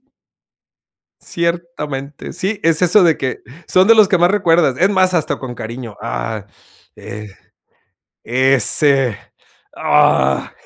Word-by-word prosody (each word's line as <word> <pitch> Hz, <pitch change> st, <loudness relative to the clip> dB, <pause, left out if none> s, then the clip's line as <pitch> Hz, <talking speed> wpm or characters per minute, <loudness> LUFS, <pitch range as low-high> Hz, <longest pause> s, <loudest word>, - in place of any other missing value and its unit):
Sí. -, -, -50 dB, 1.2 s
Ciertamente. 170 Hz, -5 st, -5 dB
Sí, 200 Hz, +3 st, -3 dB
es 165 Hz, 0 st, +2 dB
eso 180 Hz, +3 st, +4 dB
de 165 Hz, -2 st, +2 dB
que, 130 Hz, -1 st, -3 dB, 0.3 s
son 185 Hz, +1 st, +3 dB
de 230 Hz, -, +6 dB
los 215 Hz, -3 st, +5 dB
que 190 Hz, -, +2 dB
más 175 Hz, +2 st, +3 dB
recuerdas. 165 Hz, -8 st, +2 dB
Es 185 Hz, -, +3 dB
más, 185 Hz, -2 st, +2 dB
hasta 165 Hz, -4 st, -1 dB
con 125 Hz, -2 st, -8 dB
cariño. 115 Hz, -1 st, -8 dB
Ah, 100 Hz, -, -5 dB, 0.5 s
eh, 105 Hz, 0 st, -9 dB, 1.0 s
ese, 130 Hz, 0 st, +2 dB, 0.6 s
¡ah! 65 Hz, -1 st, +1 dB
150 Hz, 125 wpm, -16 LUFS, 120-180 Hz, 1.2 s, de